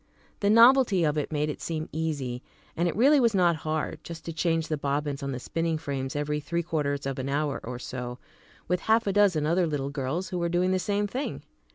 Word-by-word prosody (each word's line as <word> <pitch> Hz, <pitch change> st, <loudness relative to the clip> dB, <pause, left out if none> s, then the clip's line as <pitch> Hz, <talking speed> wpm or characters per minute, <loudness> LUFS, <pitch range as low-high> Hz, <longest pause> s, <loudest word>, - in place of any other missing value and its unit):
The 200 Hz, -, +2 dB
novelty 230 Hz, -4 st, +6 dB
of 150 Hz, -1 st, +2 dB
it 150 Hz, 0 st, -2 dB
made 150 Hz, 0 st, 0 dB
it 150 Hz, -, -5 dB
seem 160 Hz, -1 st, -3 dB
easy, 145 Hz, -6 st, -3 dB, 0.3 s
and 170 Hz, +2 st, +1 dB
it 170 Hz, -, -2 dB
really 275 Hz, +7 st, +5 dB
was 230 Hz, -4 st, +3 dB
not 175 Hz, -3 st, +3 dB
hard, 155 Hz, 0 st, -3 dB
just 165 Hz, -1 st, -9 dB
to 165 Hz, -, -4 dB
change 165 Hz, -1 st, 0 dB
the 155 Hz, -, -1 dB
bobbins 145 Hz, 0 st, -2 dB
on 140 Hz, 0 st, -3 dB
the 130 Hz, -, -4 dB
spinning 165 Hz, +4 st, -1 dB
frames 135 Hz, -3 st, -4 dB
every 150 Hz, 0 st, -1 dB
three 170 Hz, +3 st, -2 dB
quarters 145 Hz, -4 st, -2 dB
of 135 Hz, -1 st, -3 dB
an 130 Hz, +1 st, -3 dB
hour 145 Hz, 0 st, -1 dB
or 125 Hz, +1 st, -5 dB
so, 125 Hz, 0 st, -6 dB, 0.5 s
with 180 Hz, +1 st, +1 dB
half 220 Hz, +3 st, +2 dB
a 200 Hz, -, 0 dB
dozen 190 Hz, -7 st, +3 dB
other 170 Hz, +2 st, +2 dB
little 140 Hz, -3 st, -2 dB
girls 140 Hz, +7 st, -3 dB
who 180 Hz, -, -3 dB
were 170 Hz, 0 st, 0 dB
doing 180 Hz, +2 st, +1 dB
the 185 Hz, -, +2 dB
same 205 Hz, +2 st, 0 dB
thing. 255 Hz, +8 st, -4 dB
160 Hz, 225 wpm, -27 LUFS, 145-180 Hz, 0.5 s, novelty